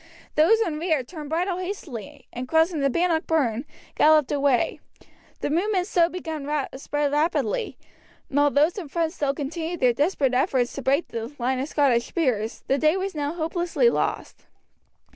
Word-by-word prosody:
Those 340 Hz, +9 st, +5 dB
in 320 Hz, -8 st, -1 dB
rear 320 Hz, -5 st, +1 dB
turned 300 Hz, +2 st, -9 dB
bridle 355 Hz, +3 st, -1 dB
hastily, 295 Hz, -, -7 dB
and 250 Hz, +1 st, -5 dB
crossing 320 Hz, +2 st, +2 dB
the 275 Hz, 0 st, +2 dB
Bannock 335 Hz, +2 st, +1 dB
Burn, 265 Hz, -6 st, +1 dB, 0.3 s
galloped 305 Hz, -2 st, +4 dB
away. 280 Hz, -4 st, +1 dB, 0.6 s
The -, -, -1 dB
movement 365 Hz, +3 st, +1 dB
so 345 Hz, -4 st, +2 dB
begun 320 Hz, -5 st, -5 dB, 0.3 s
spread 290 Hz, +1 st, -1 dB
rapidly, 295 Hz, -6 st, 0 dB, 0.5 s
and 285 Hz, -, 0 dB
although 290 Hz, 0 st, +4 dB
those 335 Hz, +6 st, 0 dB
in 340 Hz, -, -7 dB
front 325 Hz, +2 st, -1 dB
still 285 Hz, -5 st, -1 dB
continued 320 Hz, +4 st, -4 dB
their 250 Hz, -2 st, +4 dB
desperate 285 Hz, -1 st, +1 dB
efforts 255 Hz, -2 st, +1 dB
to 275 Hz, -, -5 dB
break 275 Hz, +5 st, +1 dB
the 230 Hz, +2 st, -5 dB
line 255 Hz, +1 st, 0 dB
of 270 Hz, -, -2 dB
Scottish 255 Hz, -5 st, +2 dB
spears, 240 Hz, -, -1 dB
the 275 Hz, -, +1 dB
day 310 Hz, +5 st, +3 dB
was 385 Hz, +1 st, -3 dB
now 295 Hz, -1 st, -2 dB
hopelessly 345 Hz, +7 st, +1 dB
lost. -, -, -3 dB
300 Hz, 165 wpm, -24 LUFS, 275-340 Hz, 0.6 s, Those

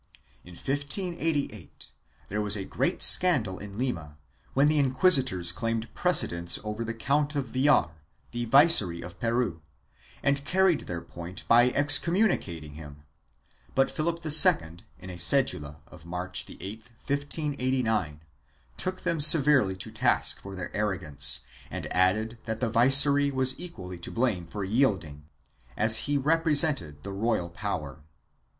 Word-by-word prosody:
In 90 Hz, 0 st, -15 dB
1588 145 Hz, -, -4 dB, 0.4 s
there 105 Hz, +2 st, -4 dB
was 105 Hz, 0 st, +1 dB
great 95 Hz, -, -3 dB
scandal 125 Hz, -, +4 dB
in 100 Hz, 0 st, -11 dB
Lima, 80 Hz, -, -5 dB, 0.4 s
when 140 Hz, +2 st, +3 dB
the 150 Hz, 0 st, +1 dB
inquisitors 130 Hz, -, +3 dB
claimed 115 Hz, +4 st, -5 dB
pre 180 Hz, -, -2 dB
cedence 85 Hz, -, +2 dB
over 105 Hz, +1 st, -6 dB
the 115 Hz, 0 st, -6 dB
Count 145 Hz, +6 st, -2 dB
of 135 Hz, -4 st, -4 dB
Villar, 130 Hz, -, +1 dB, 0.4 s
the 120 Hz, 0 st, -5 dB
Viceroy 110 Hz, -, +5 dB
of 90 Hz, -, -13 dB
Peru, 115 Hz, -8 st, -2 dB, 0.6 s
and 140 Hz, 0 st, -1 dB
carried 190 Hz, +1 st, 0 dB
their 85 Hz, -1 st, -6 dB
point 85 Hz, +2 st, -10 dB
by 120 Hz, +2 st, +4 dB
excommunicating 145 Hz, -, +1 dB
him, 75 Hz, -2 st, -13 dB, 0.7 s
but 135 Hz, 0 st, +1 dB
Philip 165 Hz, +1 st, -4 dB
II, 85 Hz, -, +4 dB, 0.2 s
in 95 Hz, -, -11 dB
a 90 Hz, -, -10 dB
cedula 80 Hz, -, +1 dB
of 85 Hz, 0 st, -17 dB
March 90 Hz, +1 st, -3 dB
8, -, -, -14 dB, 0.2 s
1589, 130 Hz, -, -3 dB, 0.6 s
took 185 Hz, 0 st, -4 dB
them 170 Hz, -3 st, -3 dB
severely 145 Hz, -, +5 dB
to 95 Hz, -, -9 dB
task -, -, +1 dB
for 100 Hz, 0 st, -10 dB
their 90 Hz, -2 st, -8 dB
arrogance 85 Hz, -9 st, +2 dB, 0.3 s
and -, -, -7 dB
added 110 Hz, +6 st, -1 dB
that 110 Hz, -1 st, -5 dB
the 115 Hz, -2 st, -3 dB
viceroy 140 Hz, +4 st, +4 dB
was 130 Hz, -1 st, +3 dB
equally 90 Hz, -, -10 dB
to 85 Hz, -, -7 dB
blame 110 Hz, -8 st, -3 dB
for 105 Hz, -, -7 dB
yielding, 95 Hz, -, -2 dB, 0.5 s
as 110 Hz, +1 st, +3 dB
he 145 Hz, -, +1 dB
represented 145 Hz, -, 0 dB
the 100 Hz, -, -8 dB
royal 100 Hz, -4 st, -3 dB
power. 80 Hz, -6 st, -6 dB
115 Hz, 135 wpm, -26 LUFS, 90-145 Hz, 0.7 s, Viceroy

